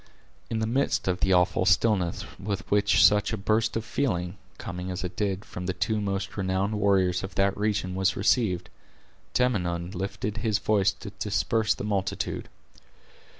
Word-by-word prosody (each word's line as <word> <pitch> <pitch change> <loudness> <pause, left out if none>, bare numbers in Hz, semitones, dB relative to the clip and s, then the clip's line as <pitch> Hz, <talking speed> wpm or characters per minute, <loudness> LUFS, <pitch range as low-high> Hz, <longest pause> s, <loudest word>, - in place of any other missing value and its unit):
In 115 - -1
the 110 - 0
midst 125 0 0
of 90 -1 0
the 95 - +2
awful 90 0 +3
stillness 95 0 +2
with 100 0 -3
which 100 -2 +5
such 105 0 +4
a 110 - -2
burst 110 +3 +1
of 115 - -4
feeling, 95 -9 -1 0.2
coming 90 -3 -6
as 90 0 -4
it 90 0 -5
did, 100 -1 -2
from 90 0 -6
the 95 - -1
two 105 +3 0
most 95 -1 -3
renowned 95 +2 -1
warriors 95 -3 +2
of 95 - -7
that 100 0 +2
region, 105 -3 -1
was 95 +1 +1
received, 95 -4 +1 0.6
Tamenund 90 -8 0
lifted 100 +3 -3
his 110 -1 +1
voice 100 -1 +2
to 100 +1 -10
disperse 105 +1 0
the - - -6
multitude. 100 -2 -2
100 Hz, 165 wpm, -27 LUFS, 95-105 Hz, 0.6 s, which